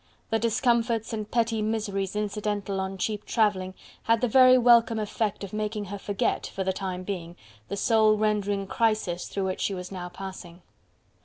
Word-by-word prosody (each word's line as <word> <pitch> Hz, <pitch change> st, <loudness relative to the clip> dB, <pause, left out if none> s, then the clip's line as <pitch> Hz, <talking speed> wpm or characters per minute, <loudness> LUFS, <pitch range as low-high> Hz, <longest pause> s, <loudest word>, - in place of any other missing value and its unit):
The 225 Hz, -, +2 dB
discomforts 230 Hz, -1 st, +1 dB
and 215 Hz, -1 st, -4 dB
petty 230 Hz, -2 st, +1 dB
miseries 210 Hz, -3 st, -2 dB
incidental 205 Hz, -1 st, -2 dB
on 190 Hz, 0 st, -3 dB
cheap 210 Hz, +2 st, -2 dB
travelling 190 Hz, -5 st, 0 dB, 0.3 s
had 230 Hz, 0 st, +3 dB
the 250 Hz, -, +2 dB
very 255 Hz, +2 st, +7 dB
welcome 235 Hz, -2 st, +5 dB
effect 210 Hz, -1 st, -2 dB
of 200 Hz, -, -7 dB
making 210 Hz, 0 st, -2 dB
her 200 Hz, +1 st, -6 dB
forget, 200 Hz, 0 st, -1 dB
for 195 Hz, -, -4 dB
the 190 Hz, 0 st, 0 dB
time 185 Hz, -1 st, -4 dB
being, 175 Hz, -3 st, -5 dB, 0.3 s
the 200 Hz, -, -4 dB
soul 220 Hz, -1 st, +4 dB
rendering 205 Hz, -2 st, 0 dB
crisis 215 Hz, -5 st, 0 dB
through 195 Hz, -, -3 dB
which 185 Hz, 0 st, -3 dB
she 195 Hz, -, 0 dB
was 180 Hz, 0 st, -7 dB
now 180 Hz, -2 st, -6 dB
passing. 180 Hz, -1 st, -9 dB
210 Hz, 170 wpm, -27 LUFS, 190-225 Hz, 0.3 s, very